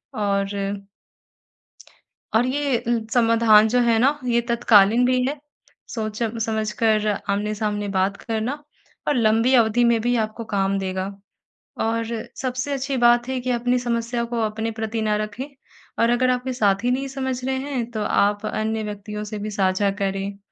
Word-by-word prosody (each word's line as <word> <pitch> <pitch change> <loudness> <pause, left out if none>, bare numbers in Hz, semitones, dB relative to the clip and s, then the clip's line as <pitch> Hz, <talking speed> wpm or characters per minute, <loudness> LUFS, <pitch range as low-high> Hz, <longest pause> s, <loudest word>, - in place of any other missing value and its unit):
और 200 -1 -1 1.8
और 240 - +3
ये 275 0 0
उम्, 230 -2 0
समाधान 225 -2 +5
जो 245 +3 +2
है 230 -1 +3
ना 275 +5 +3
ये 235 -1 +2
तत्कालीन 230 0 +5
भी 255 0 +2
है 290 +1 -5 0.5
सोच-समझकर 220 -1 -1 0.2
आमने-सामने 210 0 -1
बात 190 +2 +1
करना 235 +6 -3 0.5
और 295 - +2
लंबी 225 +2 +3
अवधि 235 0 +4
में 235 -1 +3
भी 245 +1 +1
आपको 220 +1 -2
काम 195 0 +1
देगा। 190 0 -3 0.8
और 230 +1 0 0.4
सबसे 255 +2 -2
अच्छी 270 0 -2
बात 240 0 +4
है 260 -1 -1
कि 250 +1 -1
अपनी 245 +1 +1
समस्या 235 0 -1
को 235 0 -3
अपने 220 +1 -3
प्रति 220 0 -2
न 215 - 0
रखें 215 +5 -5 0.5
और 230 - +4
अगर 255 +1 +2
आपके 250 +1 -2
साथी 215 0 +1
नहीं 270 +2 -1
समझ 260 -2 -3
रहे 265 0 0
हैं 265 -4 -3
तो 215 -2 -3
आप 205 0 +1
अन्य 220 0 -2
व्यक्तियों 210 0 -6
से 210 0 -6
भी 215 +1 -4
साझा 195 0 +1
करें 195 0 -2
230 Hz, 155 wpm, -22 LUFS, 210-245 Hz, 1.8 s, समाधान